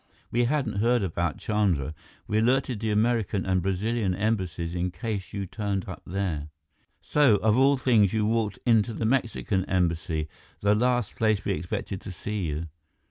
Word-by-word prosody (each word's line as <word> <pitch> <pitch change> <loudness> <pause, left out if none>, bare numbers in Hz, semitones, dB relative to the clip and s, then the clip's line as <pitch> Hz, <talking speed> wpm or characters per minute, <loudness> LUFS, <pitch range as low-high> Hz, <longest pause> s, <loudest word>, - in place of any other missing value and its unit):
We 120 +1 +2
hadn't 130 -6 0
heard 120 0 +3
about 85 -3 -1
Chandra. 95 -9 0 0.3
We 105 - +1
alerted 125 0 +1
the 110 0 -2
American 110 -2 +1
and 95 -1 +1
Brazilian 95 +2 0
Embassies 95 -5 -1
in 90 +1 -1
case 100 -1 -4
you 100 -1 -3
turned 100 0 -3
up - - -7
there. 85 -5 -2 0.5
So, 145 -7 +4
of 105 +1 +2
all 135 +2 +4
things, 115 -7 +4
you 110 -1 +1
walked 110 -2 0
into 115 -2 +3
the 110 - -2
Mexican 110 -5 0
Embassy, 85 -3 0 0.3
the 100 +1 +4
last 120 0 +1
place 110 -3 +1
we - - +1
expected 90 +4 -3
to - - -7
see 100 +1 -3
you. 75 +2 -3
105 Hz, 165 wpm, -27 LUFS, 90-115 Hz, 0.5 s, So